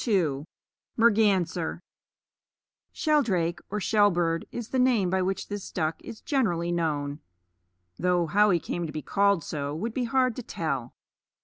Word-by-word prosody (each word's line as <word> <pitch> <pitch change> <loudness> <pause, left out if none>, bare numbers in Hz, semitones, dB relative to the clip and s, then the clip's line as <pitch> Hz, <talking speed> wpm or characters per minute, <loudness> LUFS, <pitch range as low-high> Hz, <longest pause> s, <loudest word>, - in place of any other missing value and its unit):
Shelldrake, 185 - 0 1.9
or 210 - -2
shellbird, 175 -5 +2
is 235 -2 -6
the 260 - 0
name 235 -8 +3
by 190 0 +2
which 190 +1 -2
this 205 -1 -6
duck 160 -2 -2
is 220 - -9
generally 175 - 0
known, 150 -4 -1 0.8
though 180 -1 +2
how 205 +6 +4
he 175 -3 +3
came 170 +1 -4
to - - -6
be 155 - -5
called 200 -4 +2
so 145 -1 -4
would 220 +8 -3
be 250 0 -1
hard 255 0 +1
to - - -3
tell. 140 - -4
180 Hz, 135 wpm, -27 LUFS, 165-215 Hz, 1.9 s, how